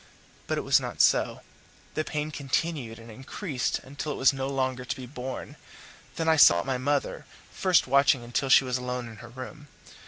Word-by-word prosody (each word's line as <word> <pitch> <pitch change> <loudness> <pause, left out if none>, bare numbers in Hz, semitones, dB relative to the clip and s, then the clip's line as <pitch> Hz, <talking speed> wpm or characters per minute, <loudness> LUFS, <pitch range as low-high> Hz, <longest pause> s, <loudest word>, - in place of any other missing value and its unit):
But - - -1
it - - 0
was - - +4
not - - -6
so; - - +3 0.5
the 155 - -1
pain 150 0 -3
continued 140 -4 -2
and 115 0 -12
increased 130 - -3
until 145 +3 -5
it - - -7
was 135 - +4
no 135 0 -3
longer 130 -2 -1
to 125 - -3
be 130 -1 -8
borne; 125 0 -7 0.6
then 165 - -2
I 160 0 +4
sought 85 - +7
my 130 -2 -1
mother, 140 +2 -1 0.2
first 185 -3 +3
watching 135 -1 +3
until 120 +3 -2
she 135 - +7
was 125 -1 -2
alone 125 -1 -4
in 110 -2 -11
her 120 - -11
room. 130 +5 -9
130 Hz, 190 wpm, -27 LUFS, 125-145 Hz, 0.6 s, sought